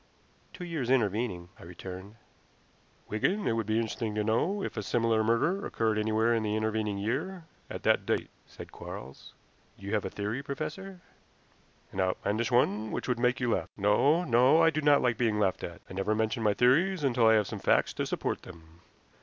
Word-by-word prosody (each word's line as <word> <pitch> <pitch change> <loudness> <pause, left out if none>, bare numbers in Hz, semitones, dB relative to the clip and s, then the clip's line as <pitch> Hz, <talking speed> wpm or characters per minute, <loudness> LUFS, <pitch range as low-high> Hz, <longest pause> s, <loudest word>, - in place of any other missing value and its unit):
"Two 180 - -9
years 155 -8 -3
intervening," 105 -7 0
I - - -12
returned. 95 +4 -9 0.9
"Wigan, 185 - 0
it - - +2
would 115 -2 -1
be 110 - 0
interesting 110 -1 -2
to 105 - 0
know 170 - 0
if - - -4
a 110 - -2
similar 115 +1 +1
murder 150 - +1
occurred 110 -1 0
anywhere 110 +2 +2
in 115 - +1
the 105 -1 -1
intervening 110 -1 -1
year 150 - -3 0.3
at - - -7
that - - +3
date," - - -1 0.2
said - - -11
Quarles. 65 +2 -10 0.4
"You 100 +2 -6
have 105 - +1
a - - -3
theory, 105 +6 -3
professor?" 155 +7 -6 0.9
"An 95 - -6
outlandish 100 +6 -1
one 110 -3 +2
which - - -4
would 125 -2 0
make 125 +1 +2
you 125 -2 0
laugh. - - -2
No, 135 - +3
no; 130 +2 +4
I 165 0 +5
do 155 - -2
not 145 -1 +4
like 120 -3 +1
being 115 -3 +1
laughed 95 -3 0
at. 85 - -7
I - - -10
never 95 +3 0
mention 110 +2 -1
my 105 -2 +2
theories 160 +8 +3
until 120 -4 +3
I 110 - +6
have 105 -1 +3
some - - -6
facts - - +2
to - - -3
support - - -2
them. 80 0 -15
115 Hz, 195 wpm, -29 LUFS, 105-135 Hz, 0.9 s, I